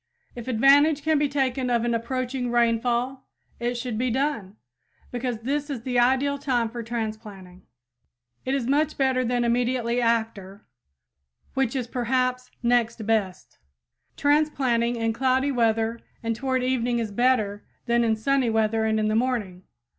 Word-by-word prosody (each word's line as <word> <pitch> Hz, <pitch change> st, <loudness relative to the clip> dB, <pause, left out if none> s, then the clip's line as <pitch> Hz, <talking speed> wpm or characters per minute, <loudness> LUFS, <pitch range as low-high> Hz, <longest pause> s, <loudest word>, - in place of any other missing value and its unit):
If 240 Hz, -1 st, -9 dB
advantage 280 Hz, +5 st, +4 dB
can 315 Hz, -1 st, +2 dB
be 290 Hz, -1 st, +1 dB
taken 265 Hz, -2 st, -1 dB
of 240 Hz, -1 st, +1 dB
an 235 Hz, -, 0 dB
approaching 250 Hz, +2 st, -2 dB
rainfall, 240 Hz, +2 st, 0 dB, 0.3 s
it 240 Hz, 0 st, -2 dB
should 235 Hz, -2 st, -4 dB
be 255 Hz, +1 st, +1 dB
done, 235 Hz, -6 st, -2 dB, 0.6 s
because 245 Hz, -2 st, -3 dB
this 285 Hz, +4 st, -2 dB
is 255 Hz, -5 st, -5 dB
the 245 Hz, -1 st, 0 dB
ideal 265 Hz, +3 st, +2 dB
time 245 Hz, -5 st, 0 dB
for 235 Hz, +1 st, -6 dB
transplanting. 215 Hz, -5 st, -6 dB, 0.8 s
It 265 Hz, -, -1 dB
is 265 Hz, -4 st, -1 dB
much 295 Hz, +4 st, +1 dB
better 265 Hz, -2 st, +2 dB
than 245 Hz, 0 st, 0 dB
immediately 240 Hz, 0 st, 0 dB
after, 220 Hz, -4 st, -1 dB, 0.9 s
which 265 Hz, -2 st, 0 dB
is 255 Hz, -3 st, -1 dB
perhaps 250 Hz, +1 st, -1 dB
next 235 Hz, -2 st, +1 dB
best. 210 Hz, -4 st, -2 dB, 0.6 s
Transplanting 275 Hz, -5 st, +1 dB
in 225 Hz, -1 st, -1 dB
cloudy 265 Hz, +3 st, +1 dB
weather 225 Hz, -2 st, +1 dB, 0.2 s
and 230 Hz, 0 st, -1 dB
toward 260 Hz, +1 st, -1 dB
evening 245 Hz, -2 st, 0 dB
is 225 Hz, -3 st, -2 dB
better 215 Hz, -3 st, +1 dB, 0.2 s
than 235 Hz, 0 st, +2 dB
in 225 Hz, -1 st, +2 dB
sunny 260 Hz, +2 st, +1 dB
weather 220 Hz, 0 st, +1 dB
and 220 Hz, 0 st, +1 dB
in 215 Hz, -, +1 dB
the 215 Hz, -, 0 dB
morning. 220 Hz, -7 st, -1 dB
240 Hz, 150 wpm, -25 LUFS, 225-260 Hz, 0.9 s, advantage